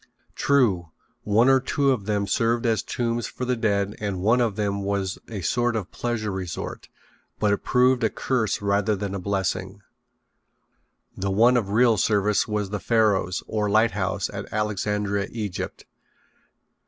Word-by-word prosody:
True, 105 - +2 0.3
one 110 +4 +3
or 135 0 +6
two 140 +1 +1
of 115 -7 -1
them 105 -1 0
served 115 +4 +1
as 115 -2 +2
tombs 120 -1 -2
for 125 - -5
the 125 0 +1
dead 100 -3 0
and 100 -3 -3
one 115 +6 +3
of 115 -4 0
them 100 -1 -1
was 100 -1 -2
a 105 -4 -5
sort 120 +5 0
of 110 - -1
a 90 - -23
pleasure 115 -3 -3
resort, 95 -3 -5 0.5
but 105 -1 +2
it 100 - -3
proved 125 0 +3
a - - +3
curse 110 -6 -1
rather 100 +1 +1
than 100 0 -4
a 100 - -3
blessing. 95 +1 -2 1.3
The 100 +1 -2
one 115 +6 +4
of 110 -5 0
real 115 +1 +4
service 105 +1 +2
was 105 -2 -2
the 105 - -2
Pharos, 100 -6 +1
or 105 -1 -1
lighthouse, 105 -3 +1
at - - -7
Alexandria, 105 -1 -1
Egypt. 105 -5 -5
105 Hz, 160 wpm, -24 LUFS, 100-115 Hz, 1.3 s, or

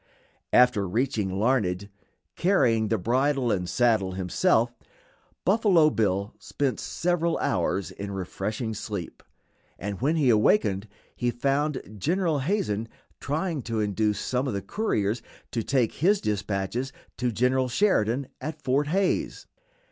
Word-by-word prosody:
After 125 -6 +4
reaching 115 -1 0
Larned 100 -5 +1 0.5
carrying 125 - +3
the 110 - +1
bridle 130 +5 +1
and 90 -3 -1
saddle 110 -7 +2
himself 115 - +1 0.7
Buffalo 190 -7 +4
Bill 100 -2 0
spent 140 -3 -2
several 170 -1 0
hours 95 +2 -1
in 100 +2 -6
refreshing 100 +4 -3
sleep, 100 -4 -6 0.6
and 100 +2 -5
when 150 +5 +2
he 140 -6 +4
awakened 105 - +3 0.3
he 120 - 0
found 135 -3 -1
General 165 - +1
Hazen 130 - -1 0.3
trying 155 +1 -2
to 115 -1 -3
induce 105 0 0
some 130 +2 -1
of 120 - -2
the 100 - -3
couriers 110 - -1 0.3
to 115 - -1
take 125 -1 +1
his 195 +6 +3
dispatches 105 +4 -2 0.3
to 125 -1 0
General 125 +3 +1
Sheridan 130 - +2 0.2
at 155 0 -5
Fort 135 +3 +1
Hays. 190 +5 0
120 Hz, 125 wpm, -26 LUFS, 105-145 Hz, 0.7 s, After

